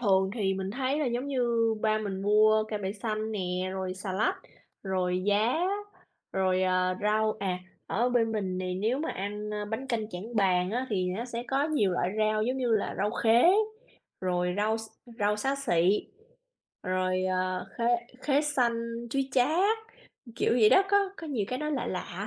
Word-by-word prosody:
thường 190 -4 +3
thì 195 -4 0
mình 190 0 -3
thấy 265 +5 -1
là, 295 - 0
giống 245 +3 -1
như, 235 -4 +1
ba 215 0 +2
mình 195 -2 -4
mua 215 +1 +4
cải 215 -1 -4
bẹ 195 0 -3
xanh 215 +1 -3
nè, 185 -1 -2
rồi 190 -1 -3
xà 190 0 -5
lách, 205 +3 +1 0.5
rồi 185 -1 -1
giá, 215 +9 +2 0.7
rồi, 185 -1 +1
à, 185 0 +2
rau 215 +1 +2
à, 185 -2 -1 0.3
ở 240 +4 +1
bên 230 -2 +2
mình 190 -4 -2
này 185 0 -2
nếu 220 +8 0
mà 320 - -2
ăn 210 +2 -4 0.2
bánh 255 +5 -3
canh 220 -4 -2
Trảng 215 +6 -6
Bàng 185 -2 +2
á, 250 +3 -1
thì 185 -3 0
nó 235 - -3
sẽ 235 -1 -5
có 275 +2 +1
nhiều 290 -12 +1
loại 180 +1 0
rau, 215 0 +2
giống 255 +4 0
như 250 -3 0
là, - - -2
rau 205 +2 +1
khế, 230 +1 +4 0.8
rồi 180 -1 0
rau 215 +2 +1
x - - -6 0.4
rau 210 +1 +2
xá 270 +6 0
xị, 190 -7 +2 0.7
rồi, 185 0 0
à, 185 0 0 0.2
khế 235 - 0 0.4
khế 285 -1 +3
xanh, 235 -4 -1
chuối 270 0 0
chát. 350 - +3 0.6
Kiểu - - +2
vậy 225 -3 +6
đó, 385 - +7
có 400 -1 +3
có 325 - -8
nhiều 250 -9 -1
cái 255 - -2
nó 300 0 -2
lạ 270 -5 -1
lạ. 185 +2 -4
215 Hz, 190 wpm, -29 LUFS, 190-240 Hz, 0.8 s, đó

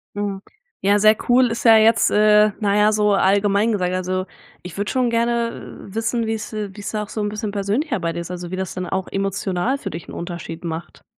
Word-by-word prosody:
Mhm. 200 -1 -3 0.4
Ja, 205 +1 +3
sehr 215 +1 +6
cool 250 +1 +5
ist 235 - -4
ja 225 -1 +8
jetzt, 225 +1 +4
äh, 210 0 +5
na 205 -1 +1
ja, 210 +1 +4
so 210 -1 +2
allgemein 200 +3 +2
gesagt. 180 -3 -1
Also, 185 0 -2 0.4
ich 180 +1 -10
würde 205 +1 -2
schon 255 -2 +1
gerne 235 0 -2
wissen 225 +1 -1
wie's, 220 0 -4
äh, 210 -2 -3
wie's 205 - -6
da 210 -1 -2
auch 205 - -11
so 220 - -5
'n 205 - -1
bisschen 210 0 -4
persönlicher 205 - -1
bei 165 -1 -2
dir - - -4
ist? 170 - -6
Also, 175 0 -6
wie - - -2
das 190 -1 -4
dann 185 0 -3
auch 190 -1 -2
emotional 195 +5 -1
für - - -5
dich 165 +2 -8
'n - - -10
Unterschied 170 -1 -7
macht. 165 0 -6
205 Hz, 225 wpm, -21 LUFS, 185-220 Hz, 0.4 s, ja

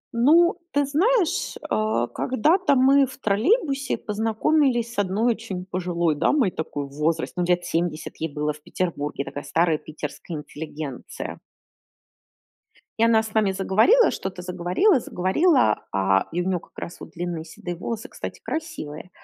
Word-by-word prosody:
Ну, 335 +9 +5
ты 285 0 +2
знаешь, 365 - +1 0.2
а, 215 - +1
когда-то 285 - +2
мы 270 +1 +5
в 260 - -11
троллейбусе 275 - +1
познакомились 235 +3 +1
с - - -3
одной 205 +5 +2
очень 185 -4 -6
пожилой 175 -3 0
дамой 210 - +2
такой 145 -3 -4
в 140 - -13
возрасте, 160 +1 0
ну, 180 - 0
лет 175 0 +1
70 165 -2 -2
ей 160 -1 -3
было 150 +1 -1
в 150 - -16
Петербурге, 150 -4 -3
такая 145 +1 -6
старая 160 +2 +1
питерская 155 +2 -7
интеллигенция. 150 -2 -7 1.6
И - - +4
она 225 -1 +5
с 220 -1 -8
нами 215 -3 +3
заговорила, 215 - +4
что-то 185 -1 -5
заговорила, 185 - +2
заговорила, 190 - +2
а, 95 0 +2
и 175 - -1
у - - -3
неё 185 -2 +1
как - - -22
раз 170 - -7
вот - - -10
длинные 175 -2 -4
седые 175 +2 -7
волосы, 220 +5 -5
кстати, - - -7
красивые. 310 - -5
190 Hz, 150 wpm, -24 LUFS, 160-265 Hz, 1.6 s, Ну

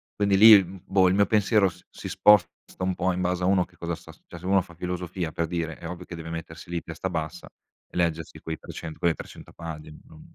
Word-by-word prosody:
quindi 100 -1 +2
lì, 110 -1 +10
l 95 0 -6
boh, 95 -1 +4
il 90 - +3
mio 100 0 +4
pensiero 105 -1 +3
s 90 - -16
si - - -9
sposta 105 -5 +5 0.3
un 95 0 +1
po', 95 +1 0
in 90 - -3
base 90 0 0
a - - +2
uno 95 -2 +3
che 90 - -25
cosa 85 0 -3
sta 85 -1 -14
st 80 - -23
cioè, 85 - -10
se 85 - -11
uno 95 0 +4
fa 85 -2 -14
filosofia, 90 -1 -4
per 85 +1 -2
dire, 80 -2 -3
è 85 - -7
ovvio 90 +1 -7
che 90 - -8
deve 80 0 -8
mettersi 80 0 -8
lì, 85 -1 -2
testa 85 +3 -5
bassa, 80 -3 -4
e - - -16
leggersi 80 -2 -1
quei 80 0 -5
300, 80 -2 -8
quelle 85 -2 +2
300 - - -11
pagine, 75 -2 -8
non 80 -1 -15
90 Hz, 250 wpm, -26 LUFS, 80-95 Hz, 0.3 s, lì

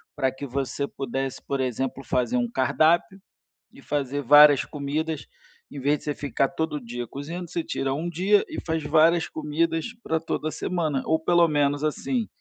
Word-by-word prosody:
para 130 - +1
que 130 +2 -7
você 140 +1 -2
pudesse, 135 0 -4
por 140 -1 -1
exemplo, 130 +1 -2
fazer 125 -1 0
um 120 -1 0
cardápio, 160 +9 +2 0.5
e - - -15
fazer 145 -1 -2
várias 145 +1 +7
comidas, 150 +1 -3 0.4
em 145 - -8
vez 145 +3 +1
de - - -17
você 150 - -2
ficar 135 -1 0
todo 160 -2 -3
dia 120 0 -6
cozinhando, 165 +7 -6
você 170 - -2
tira 135 -3 -2
um 165 +5 -3
dia 190 +5 +3
e - - -7
faz 160 -1 -1
várias 160 +3 +3
comidas 160 +1 -1 0.2
para 160 - 0
toda 155 -1 -3
semana, 155 -6 -2
ou 160 0 +2
pelo 175 0 +4
menos 145 -1 +1
assim: 225 - -1
150 Hz, 175 wpm, -25 LUFS, 135-160 Hz, 0.5 s, várias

